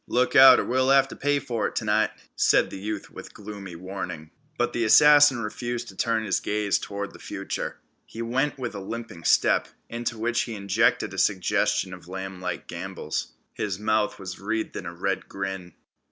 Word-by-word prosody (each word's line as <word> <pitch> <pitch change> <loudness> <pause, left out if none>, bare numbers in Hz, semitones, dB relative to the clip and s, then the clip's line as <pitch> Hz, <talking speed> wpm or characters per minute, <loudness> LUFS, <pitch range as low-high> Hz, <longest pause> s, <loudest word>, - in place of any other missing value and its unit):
"Look 125 +1 +1
out, 135 -1 +9
or - - -1
we'll 130 +1 +1
have 135 0 +5
t' - - -9
pay 145 +1 +1
fer 120 -5 -2
it - - -9
t'night," 110 -1 +2 0.3
said - - +3
the - - -7
youth 105 0 -5
with - - -11
gloomy 100 -3 -8
warning. 85 -3 -6 0.3
But 120 - 0
the 120 - 0
assassin 145 +1 +7
refused 120 +2 -4
to 95 - -12
turn 115 +2 0
his 110 - 0
gaze 105 -1 0
toward 100 0 -5
the - - -13
future. - - -5 0.3
He 115 - -6
went 135 +5 0
with 125 -3 -4
a 100 - -6
limping 100 -4 -7
step, - - +3 0.2
into 120 0 -3
which 120 +2 0
he 115 - -4
injected 100 +3 +1
a - - -4
suggestion 95 0 +1
of 90 -2 -12
lamblike 95 -1 -5
gambols. 85 -3 -5 0.2
His 100 -3 -3
mouth 110 0 0
was 95 -2 -7
wreathed 110 +3 -3
in - - -5
a 85 - -7
red 95 +2 -2
grin. 95 -3 -5
105 Hz, 185 wpm, -25 LUFS, 95-120 Hz, 0.3 s, out